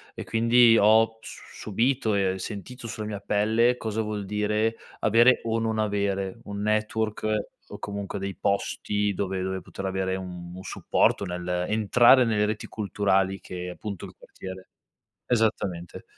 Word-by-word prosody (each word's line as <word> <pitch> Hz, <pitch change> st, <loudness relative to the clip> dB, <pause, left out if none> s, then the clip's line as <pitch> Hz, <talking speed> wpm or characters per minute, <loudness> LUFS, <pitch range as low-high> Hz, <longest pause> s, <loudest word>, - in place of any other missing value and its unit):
e -, -, -5 dB
quindi 115 Hz, 0 st, +5 dB
ho 110 Hz, +2 st, +4 dB
s -, -, -12 dB
subito 115 Hz, +1 st, +1 dB
e 95 Hz, -1 st, 0 dB
sentito 115 Hz, +5 st, -7 dB
sulla 110 Hz, -1 st, -5 dB
mia 105 Hz, -2 st, -4 dB
pelle 110 Hz, +4 st, +2 dB
cosa 110 Hz, -1 st, -2 dB
vuol 105 Hz, -2 st, -4 dB
dire 105 Hz, +2 st, 0 dB, 0.2 s
avere 115 Hz, +3 st, +5 dB
o 115 Hz, 0 st, 0 dB
non 110 Hz, -1 st, -1 dB
avere 100 Hz, -2 st, -1 dB
un 100 Hz, 0 st, -5 dB
network 110 Hz, +1 st, -1 dB, 0.5 s
o -, -, -6 dB
comunque 100 Hz, -1 st, -5 dB
dei 100 Hz, -1 st, -4 dB
posti 100 Hz, +2 st, -1 dB
dove 95 Hz, 0 st, -2 dB
dove 95 Hz, 0 st, -3 dB
poter 95 Hz, -, -8 dB
avere 95 Hz, 0 st, -1 dB
un 90 Hz, -2 st, -7 dB
un 95 Hz, -, -9 dB
supporto, -, -, +1 dB
nell'entrare 100 Hz, +8 st, +3 dB
nelle 105 Hz, -2 st, +2 dB
reti 105 Hz, 0 st, -3 dB
culturali 95 Hz, -2 st, 0 dB
che 90 Hz, 0 st, -6 dB
appunto 100 Hz, +1 st, -6 dB
il -, -, -12 dB
quartiere 95 Hz, 0 st, -10 dB, 0.6 s
esattamente. 100 Hz, -7 st, -1 dB
105 Hz, 145 wpm, -26 LUFS, 95-110 Hz, 0.6 s, quindi